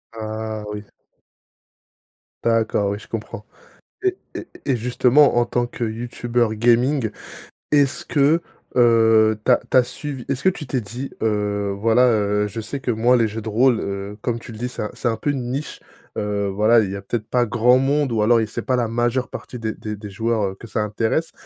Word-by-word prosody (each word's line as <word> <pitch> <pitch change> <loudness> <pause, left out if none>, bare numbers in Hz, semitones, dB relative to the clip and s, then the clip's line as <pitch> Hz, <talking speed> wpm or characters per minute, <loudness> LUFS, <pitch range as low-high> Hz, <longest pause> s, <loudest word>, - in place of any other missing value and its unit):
Ah 110 0 -5
oui! 105 0 -6 1.6
D'accord, 110 -3 +1
oui 100 - -4
je - - -14
comprends. 110 -1 -6 0.6
Et 375 0 +2 0.2
et - - -6 0.2
et 135 - +1
justement 125 +4 +3
en 120 - +4
tant 120 0 0
que 120 - -9
youtubeur 120 0 -1
gaming, 120 +2 +2 0.6
est-ce 145 -2 +2
que, 150 +3 +3 0.3
heu, 115 -3 +5
tu - - +4
as 125 - +5
tu - - +5
as 125 - +6
suivi 125 +1 -6
est-ce 140 -1 -2
que 190 - +6
tu 150 -6 -6
t'es 130 -2 -1
dit: 120 +7 -6
«Heu, 105 -2 0
voilà, 115 +3 +4
heu, 105 -1 +1
je 110 +3 -6
sais 135 +5 -5
que 125 - -1
moi 120 +3 +3
les 115 -2 +3
jeux 110 +1 -5
de 110 - -8
rôle, 120 +2 +3
heu- 100 +1 -5
comme 115 0 -1
tu 115 - -11
le 110 - -9
dis- 125 +3 -3
c'est 125 - -5
c'est - - -2
un 115 - +1
peu 145 - -3
une 130 -4 -2
niche»? 140 +4 -4 0.4
Heu, 100 -1 -1
voilà 110 +4 +4
il 95 -2 -2
y - - -4
a - - -7
peut-être 110 0 -4
pas 125 -1 +2
grand 120 +2 +4
monde 140 0 +1
ou 110 - +1
alors 115 +2 +4
il 110 - -1
c'est - - -4
pas 130 - 0
la 120 -2 0
majeure 120 +2 0
partie 125 - -8
des 110 -1 -2
des 105 0 -6
des 105 0 -9
joueurs, 110 +2 -1
heu, 95 - -11
que 115 - -12
ça 105 - -2
intéresse. 110 +9 -1
115 Hz, 210 wpm, -21 LUFS, 110-125 Hz, 1.6 s, as